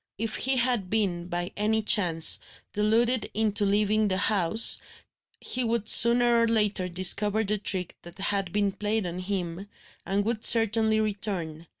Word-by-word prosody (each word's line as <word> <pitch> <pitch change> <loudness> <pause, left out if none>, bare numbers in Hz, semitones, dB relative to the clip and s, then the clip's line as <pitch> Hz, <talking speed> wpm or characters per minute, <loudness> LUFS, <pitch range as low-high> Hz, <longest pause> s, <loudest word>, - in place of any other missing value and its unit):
If 225 +1 -4
he 265 0 0
had 240 -6 -1
been, 185 -5 -3
by 175 0 -6
any 220 +1 -2
chance, 175 -7 +4 0.3
deluded 225 +3 -1
into 210 -1 +1
leaving 210 +1 -1
the 185 -1 -2
house, 200 +1 +3 0.6
he 255 - -2
would 230 -2 -3
sooner 235 0 +4
or 230 - 0
later 210 -4 -1
discover 200 +4 +2
the 210 0 -3
trick 185 -3 -2
that 175 +3 -15
had 195 -2 -3
been 205 0 -2
played 210 +1 -4
on 175 +1 -7
him, 185 0 -6 0.3
and 200 +1 -3
would 225 -1 -4
certainly 220 -1 +4
return. 195 -7 -5
210 Hz, 155 wpm, -24 LUFS, 185-220 Hz, 0.6 s, chance